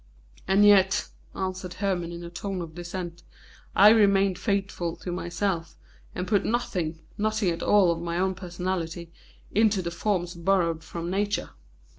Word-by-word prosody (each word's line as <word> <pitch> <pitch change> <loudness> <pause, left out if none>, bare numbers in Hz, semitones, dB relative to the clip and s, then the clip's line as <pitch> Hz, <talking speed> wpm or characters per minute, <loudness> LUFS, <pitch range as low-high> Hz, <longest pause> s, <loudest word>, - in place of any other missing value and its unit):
"And 195 +2 +5
yet," 195 -2 +5 0.3
answered 185 -1 -4
Hermon 180 -4 -1
in 170 0 -7
a 170 - -8
tone 190 +2 -4
of 160 -1 -9
dissent, 175 0 -6 0.5
"I 205 +2 +9
remained 200 -3 +4
faithful 195 -5 -1
to 180 - -6
myself, 175 -1 -2 0.4
and 180 0 -3
put 205 -1 +2
nothing, 180 -9 -1 0.2
nothing 215 -3 +1
at 165 - -4
all 200 -4 +4
of 165 0 -3
my 170 0 -2
own 190 +1 +1
personality, 175 -2 -4 0.4
into 210 -2 +3
the 170 - -3
forms 175 -1 -1
borrowed 170 -2 +1
from 170 +1 -5
Nature." 205 +1 -1
185 Hz, 150 wpm, -26 LUFS, 170-200 Hz, 0.5 s, I